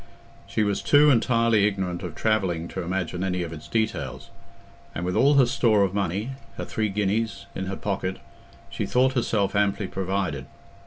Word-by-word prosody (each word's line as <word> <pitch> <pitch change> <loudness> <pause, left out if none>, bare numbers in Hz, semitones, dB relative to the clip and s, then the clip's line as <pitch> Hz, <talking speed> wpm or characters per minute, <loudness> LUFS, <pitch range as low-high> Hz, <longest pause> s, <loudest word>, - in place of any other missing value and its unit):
She 110 - 0
was 100 -1 0
too 145 0 +6
entirely 115 -3 +3
ignorant 95 -4 -2
of 90 -4 -6
traveling 95 -7 0
to 95 - -4
imagine 90 0 -2
any 90 -2 -1
of 85 -1 -6
its 75 - -10
details, 70 - -2 0.6
and 85 +3 -3
with 90 - -1
all 145 +2 +5
her 135 -2 +6
store 115 -4 +3
of 95 -1 0
money—her 105 +6 -4
three 110 -1 -1
guineas—in 100 -1 -2
her 95 - -3
pocket, 95 -2 -2 0.5
she - - -3
thought 130 +1 +3
herself 110 -5 0
amply 100 0 +1
provided. 95 -8 -2
100 Hz, 160 wpm, -25 LUFS, 90-115 Hz, 0.6 s, too